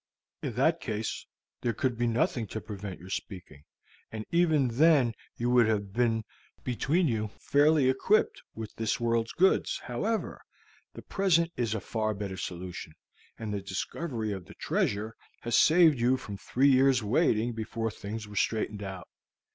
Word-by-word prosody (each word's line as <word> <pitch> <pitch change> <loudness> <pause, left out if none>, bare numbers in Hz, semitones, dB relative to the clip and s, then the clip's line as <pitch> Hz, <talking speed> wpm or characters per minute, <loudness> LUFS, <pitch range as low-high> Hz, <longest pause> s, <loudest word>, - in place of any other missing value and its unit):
In - - -3
that - - +2
case, 110 0 -4 0.3
there 120 - 0
could 125 +1 0
be 120 +1 0
nothing 115 0 0
to 110 - -5
prevent 100 -3 -7
your 90 +3 -11
speaking; 90 -9 -7 0.5
and 110 -1 -5
even 160 -6 +3
then 135 -1 +4 0.2
you 120 +1 0
would 120 -3 +5
have 100 -3 -1
been 115 -1 +1 0.4
between 155 +8 +1
you 110 -4 -1
very 105 - -20
fairly 145 -1 +4
equipped 160 +11 +2
with 110 -1 -7
this 115 +4 -1
world's 115 -1 0
goods. 190 +2 +2
However, 210 - -2 0.5
the - - -9
present 170 -4 +2
is 115 -3 -1
a - - -1
far 110 +2 -2
better 100 -2 -5
solution, 90 -3 -6 0.4
and 110 -2 -4
the 100 - -2
discovery 110 - -3
of 95 -3 -5
the - - -14
treasure 110 +2 -1 0.3
has 120 -1 0
saved 160 -4 +6
you 125 +2 +3
from 100 -5 -7
three 135 +7 +2
years' 130 -2 +4
waiting 110 +2 +2
before 115 0 -3
things 105 +1 -6
were 105 - -11
straightened 105 0 -1
out. 95 -2 -7
115 Hz, 165 wpm, -29 LUFS, 105-130 Hz, 0.5 s, saved